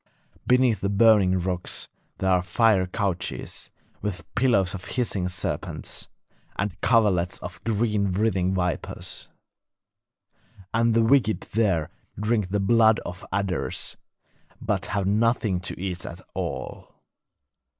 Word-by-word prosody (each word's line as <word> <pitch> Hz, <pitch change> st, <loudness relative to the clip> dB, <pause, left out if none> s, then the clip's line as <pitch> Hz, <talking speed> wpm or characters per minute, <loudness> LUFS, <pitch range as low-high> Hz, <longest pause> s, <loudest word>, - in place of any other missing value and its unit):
Beneath 125 Hz, -3 st, +4 dB
the 100 Hz, -, 0 dB
burning 100 Hz, -3 st, +5 dB
rocks 90 Hz, 0 st, -2 dB, 0.3 s
there 95 Hz, 0 st, +1 dB
are 90 Hz, -1 st, +4 dB
fiery 95 Hz, +1 st, +3 dB
couches, 95 Hz, -2 st, -3 dB, 0.3 s
with 100 Hz, -3 st, -3 dB
pillows 105 Hz, -7 st, +2 dB
of 95 Hz, -2 st, -7 dB
hissing 100 Hz, -7 st, -1 dB
serpents, 90 Hz, -1 st, -3 dB, 0.5 s
and 95 Hz, -2 st, -3 dB
coverlets 100 Hz, -7 st, +3 dB
of -, -, -8 dB
green 105 Hz, -3 st, +1 dB
writhing 95 Hz, -2 st, +1 dB
vipers. 90 Hz, -2 st, -3 dB, 1.4 s
And 115 Hz, 0 st, +3 dB
the 115 Hz, -, +5 dB
wicked 115 Hz, -2 st, +3 dB
there 95 Hz, -8 st, +1 dB, 0.3 s
drink 105 Hz, -2 st, +1 dB
the 105 Hz, +2 st, 0 dB
blood 110 Hz, +2 st, +4 dB
of 90 Hz, +1 st, -8 dB
adders, 95 Hz, -2 st, -2 dB, 0.6 s
but -, -, -1 dB
have 100 Hz, -2 st, -1 dB
nothing 105 Hz, -1 st, +2 dB
to 90 Hz, -, -5 dB
eat 90 Hz, -1 st, -3 dB
at 85 Hz, -, -8 dB
all. -, -, -5 dB
100 Hz, 120 wpm, -25 LUFS, 90-115 Hz, 1.4 s, burning